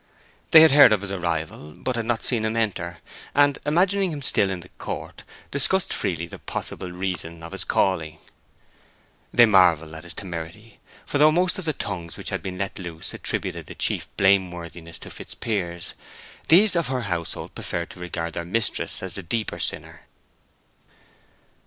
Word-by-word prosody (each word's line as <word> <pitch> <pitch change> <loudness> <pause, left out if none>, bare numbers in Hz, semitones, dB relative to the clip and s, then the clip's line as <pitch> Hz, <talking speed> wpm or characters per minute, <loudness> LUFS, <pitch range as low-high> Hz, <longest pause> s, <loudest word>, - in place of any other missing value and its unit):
They 160 - +10
had 160 - +8
heard 145 -4 +9
of 105 - +1
his 100 -1 -5
arrival, 80 -4 -3
but 130 +9 -3
had 115 -1 -2
not 120 -2 0
seen 115 -4 0
him 110 +1 -1
enter, 85 -6 -1 0.4
and, 145 0 +4
imagining 185 +4 +2
him 145 -3 -5
still 100 -6 +4
in 95 -2 -3
the 90 - -14
court, - - -6 0.3
discussed 180 +7 +2
freely 85 -5 -1
the 85 - -10
possible 90 - -5
reason 90 -3 -3
of 85 - -8
his - - -3
calling. 80 -4 0 1.1
They 120 - +7
marvelled 85 -7 +4
at 80 0 -8
his 85 -1 -7
temerity; 90 +4 -7 0.3
for 145 - -1
though 155 +1 +7
most 180 +3 +1
of 185 - -6
the 155 - +1
tongues 90 - -5
which - - -5
had - - -2
been 95 -1 -5
let 100 +1 -3
loose 85 -3 -5
attributed - - -3
the - - -9
chief - - -1
blame 95 -1 +4
worthiness 85 -1 -9
to - - -10
Fitzpiers, 85 -6 -4 0.6
these 185 +4 +6
of 170 -4 +1
her 130 -1 -1
household 85 -6 -4
preferred 85 -1 -4
to - - -13
regard 85 -2 -4
their 85 - -3
mistress 110 +4 -1
as 95 -2 -5
the 100 - -6
deeper 110 +5 -3
sinner. - - -3
95 Hz, 175 wpm, -24 LUFS, 85-125 Hz, 1.1 s, They